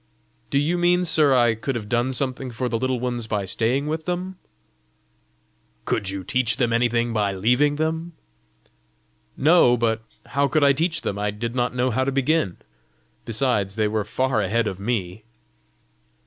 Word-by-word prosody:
"Do -, -, 0 dB
you 160 Hz, +5 st, +1 dB
mean, 175 Hz, +1 st, +3 dB
sir, 155 Hz, -4 st, +3 dB
I 120 Hz, -2 st, +4 dB
could 115 Hz, +4 st, -4 dB
have 110 Hz, -3 st, -4 dB
done 120 Hz, +3 st, 0 dB
something 130 Hz, 0 st, -3 dB
for 125 Hz, +2 st, -3 dB
the 115 Hz, -1 st, -1 dB
Little 130 Hz, 0 st, -1 dB
Ones 120 Hz, -2 st, -3 dB
by 105 Hz, -3 st, -2 dB
staying 120 Hz, +8 st, 0 dB
with 160 Hz, +1 st, -3 dB
them?" 180 Hz, +1 st, -3 dB, 1.5 s
"Could 100 Hz, -4 st, -1 dB
you 95 Hz, -1 st, -4 dB
teach 120 Hz, +4 st, 0 dB
them 120 Hz, -3 st, +1 dB
anything 120 Hz, 0 st, +1 dB
by 105 Hz, -3 st, 0 dB
leaving 125 Hz, +9 st, +2 dB
them?" 160 Hz, +2 st, -2 dB, 1.2 s
"No; 145 Hz, -5 st, +5 dB
but 115 Hz, -1 st, 0 dB, 0.2 s
how 140 Hz, 0 st, +1 dB
could 150 Hz, +1 st, +1 dB
I 140 Hz, -1 st, +6 dB
teach 160 Hz, +3 st, 0 dB
them? 100 Hz, -, -3 dB
I 105 Hz, 0 st, 0 dB
did 115 Hz, +3 st, -4 dB
not 125 Hz, 0 st, -1 dB
know 125 Hz, 0 st, +1 dB
how 130 Hz, +3 st, +1 dB
to 135 Hz, -, -1 dB
begin. 135 Hz, -, 0 dB, 0.7 s
Besides, 110 Hz, -4 st, 0 dB
they 110 Hz, -1 st, +1 dB
were 105 Hz, 0 st, -1 dB
far 130 Hz, +2 st, 0 dB
ahead 110 Hz, +4 st, 0 dB
of 95 Hz, -3 st, -4 dB
me!" 105 Hz, -2 st, -3 dB
125 Hz, 170 wpm, -23 LUFS, 110-140 Hz, 1.5 s, I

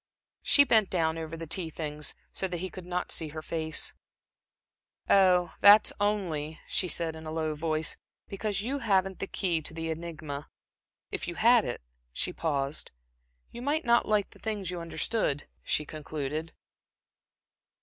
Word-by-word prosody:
She 285 Hz, -, +6 dB
bent 220 Hz, -7 st, +4 dB
down 165 Hz, -2 st, 0 dB
over 160 Hz, 0 st, -5 dB
the 165 Hz, -, -6 dB
tea 165 Hz, +1 st, 0 dB
things, 150 Hz, -1 st, -2 dB, 0.2 s
so 190 Hz, -, -1 dB
that 180 Hz, -1 st, -4 dB
he 185 Hz, +1 st, -4 dB
could 185 Hz, -1 st, -9 dB
not 180 Hz, 0 st, -2 dB
see 160 Hz, -, +3 dB
her 155 Hz, +1 st, -7 dB
face. 160 Hz, -1 st, -1 dB, 1.1 s
"Oh, 185 Hz, -2 st, +4 dB
that's 205 Hz, +1 st, +8 dB
only," 170 Hz, -7 st, -1 dB
she 185 Hz, -, +1 dB
said, 165 Hz, -2 st, 0 dB
in 160 Hz, 0 st, -9 dB
a -, -, -4 dB
low 160 Hz, -1 st, -1 dB
voice 155 Hz, 0 st, -1 dB, 0.3 s
"because 200 Hz, 0 st, -2 dB
you 275 Hz, +5 st, -2 dB
haven't 195 Hz, -5 st, +1 dB
the 195 Hz, -, -3 dB
key 175 Hz, -5 st, 0 dB
to 160 Hz, -, -6 dB
the 165 Hz, 0 st, -2 dB
enigma. 155 Hz, -3 st, -6 dB, 0.6 s
If -, -, -3 dB
you 175 Hz, -, -4 dB
had 235 Hz, +2 st, +5 dB
it" 120 Hz, -, -4 dB, 0.3 s
She 180 Hz, -, -3 dB
paused. 145 Hz, -3 st, 0 dB, 0.6 s
"You 240 Hz, -, -8 dB
might 290 Hz, +4 st, 0 dB
not 235 Hz, 0 st, +4 dB
like 210 Hz, -2 st, +1 dB
the -, -, -16 dB
things 205 Hz, -5 st, -3 dB
you 175 Hz, -1 st, -4 dB
understood," 165 Hz, -3 st, -1 dB, 0.2 s
she 150 Hz, -, 0 dB
concluded. 155 Hz, +1 st, -4 dB
170 Hz, 160 wpm, -29 LUFS, 155-195 Hz, 1.1 s, that's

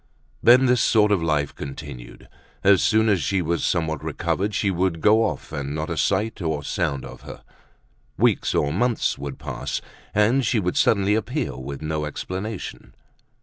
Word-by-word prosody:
Then 125 Hz, +2 st, +6 dB
this 125 Hz, -2 st, +3 dB
sort 105 Hz, -2 st, +4 dB
of 100 Hz, -4 st, +2 dB
life 75 Hz, -3 st, 0 dB
continued. 70 Hz, -3 st, -9 dB, 0.4 s
As 95 Hz, -2 st, +5 dB
soon 110 Hz, 0 st, +3 dB
as 100 Hz, -5 st, +2 dB
she 95 Hz, +3 st, 0 dB
was 85 Hz, 0 st, -1 dB
somewhat 80 Hz, -3 st, -1 dB
recovered 105 Hz, +2 st, -2 dB
she 100 Hz, -, +1 dB
would 90 Hz, -2 st, 0 dB
go 110 Hz, +7 st, +4 dB
off -, -, -4 dB
and 70 Hz, -1 st, -4 dB
not 80 Hz, 0 st, -3 dB
a -, -, -1 dB
sight 110 Hz, -1 st, 0 dB
or 80 Hz, -3 st, -2 dB
sound 70 Hz, -1 st, -2 dB
of -, -, -11 dB
her. -, -, -11 dB, 0.7 s
Weeks -, -, +2 dB
or 75 Hz, 0 st, +1 dB
months 120 Hz, -, 0 dB
would 70 Hz, -1 st, -6 dB
pass -, -, -4 dB, 0.4 s
and 115 Hz, +6 st, +3 dB
she 115 Hz, 0 st, +1 dB
would 90 Hz, -3 st, -1 dB
suddenly 100 Hz, -1 st, +3 dB
appear 115 Hz, -, -2 dB
with 70 Hz, +3 st, -7 dB
no 75 Hz, 0 st, -2 dB
explanation. 95 Hz, +7 st, -6 dB
90 Hz, 170 wpm, -23 LUFS, 75-110 Hz, 0.7 s, Then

